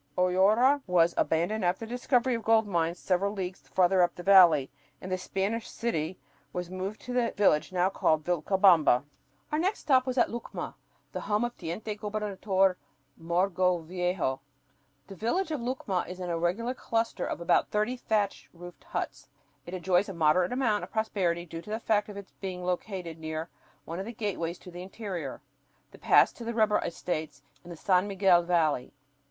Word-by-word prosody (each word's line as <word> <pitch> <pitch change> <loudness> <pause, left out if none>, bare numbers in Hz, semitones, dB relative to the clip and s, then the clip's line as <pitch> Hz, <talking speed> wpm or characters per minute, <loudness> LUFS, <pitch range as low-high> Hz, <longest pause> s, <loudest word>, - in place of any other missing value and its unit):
"Hoyara" 205 +10 +4
was 170 -2 +3
abandoned 175 +6 0
after 180 +5 0
the 225 - -11
discovery 250 0 +1
of 230 - -2
gold 225 0 +3
mines 170 -3 -1
several 195 +3 0
leagues 190 -2 -5
farther 185 0 +3
up 175 -1 +2
the 175 - -8
valley, 175 -8 +6 0.3
and 185 - -8
the 185 - +1
Spanish 195 +5 -2
"city" 180 -6 -2 0.4
was 180 0 -4
moved 190 +3 -4
to 250 - -6
the 245 -2 +1
village 190 -7 +3
now 180 0 +2
called 155 -4 +1
Vilcabamba. 175 -5 +4 0.5
Our 300 - +1
next 380 +5 0
stop 260 -2 +3
was 255 0 -2
at 240 - +3
Lucma, 235 +1 -6 0.4
the - - -5
home 210 +2 0
of 240 - -5
Teniente 180 +6 -5
Gobernador 205 -3 0 0.4
Mogrovejo. 180 -3 0 0.7
The 195 - -10
village 320 - -1
of 300 -5 -2
Lucma 235 -7 -2
is 180 0 -8
an 180 -1 -3
irregular 175 +9 -1
cluster 230 -2 -2
of - - -4
about 170 +1 +2
thirty 215 +4 0
thatched 205 - -1
roofed 175 -2 -12
huts. - - -5 0.4
It 180 - -5
enjoys 185 +2 +1
a 195 - -6
moderate 165 +3 +3
amount 250 -5 +1
of - - -7
prosperity 185 -6 -1
due 165 -1 -7
to 210 - -13
the 220 +1 -2
fact 215 -2 +1
of 205 - -8
its 200 -1 -10
being 180 -2 -5
located 180 -2 -3
near 160 +1 -4 0.4
one 165 +2 -5
of 190 - -4
the 235 - -6
gateways 185 -6 -3
to 180 - -11
the 175 +1 -8
interior, 185 - -6 0.5
the - - -15
pass - - +5
to 235 - -10
the 230 0 -4
rubber 215 -2 +3
estates 155 -5 -4 0.2
in 175 - -13
the 170 - -8
San 185 +2 +2
Miguel 190 -3 +4
Valley. 165 -7 0
185 Hz, 180 wpm, -28 LUFS, 175-215 Hz, 0.7 s, valley